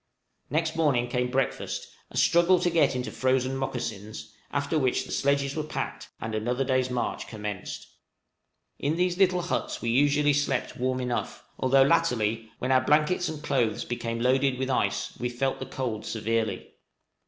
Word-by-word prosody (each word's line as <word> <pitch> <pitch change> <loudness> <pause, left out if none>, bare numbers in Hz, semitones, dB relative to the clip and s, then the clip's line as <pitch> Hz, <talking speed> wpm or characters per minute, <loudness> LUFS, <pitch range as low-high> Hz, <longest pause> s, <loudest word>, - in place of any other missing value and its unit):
Next 160 +3 0
morning 140 -7 +2
came 125 0 -1
breakfast, 135 +1 -1 0.2
a - - -7
struggle 170 +2 +5
to 175 - +2
get 165 -5 +3
into 125 0 -3
frozen 130 0 +1
mocassins, 115 -5 -5 0.2
after 145 +2 0
which 130 -3 +1
the - - -9
sledges 140 0 +1
were 155 - 0
packed, 155 - -5
and 110 0 -4
another 120 +5 0
day's 130 -1 +1
march 125 -1 -2
commenced. 105 -3 -6 0.9
In 150 +3 0
these 180 +1 0
little 180 -2 +3
huts 175 - -2
we 115 - -1
usually 145 +3 +4
slept 140 -3 0
warm 130 +1 -1
enough, 125 -1 -3 0.2
although 135 +1 +5
latterly, 115 -4 +1
when 130 - -2
our 130 -1 +5
blankets 150 +6 +2
and 155 -1 -6
clothes 120 -7 0
became 115 -1 -3
loaded 130 +2 +2
with 130 +1 -1
ice, - - 0
we 125 - -1
felt 130 +2 -1
the 130 - -5
cold 125 -5 -3
severely. 110 0 -2
130 Hz, 165 wpm, -27 LUFS, 120-145 Hz, 0.9 s, struggle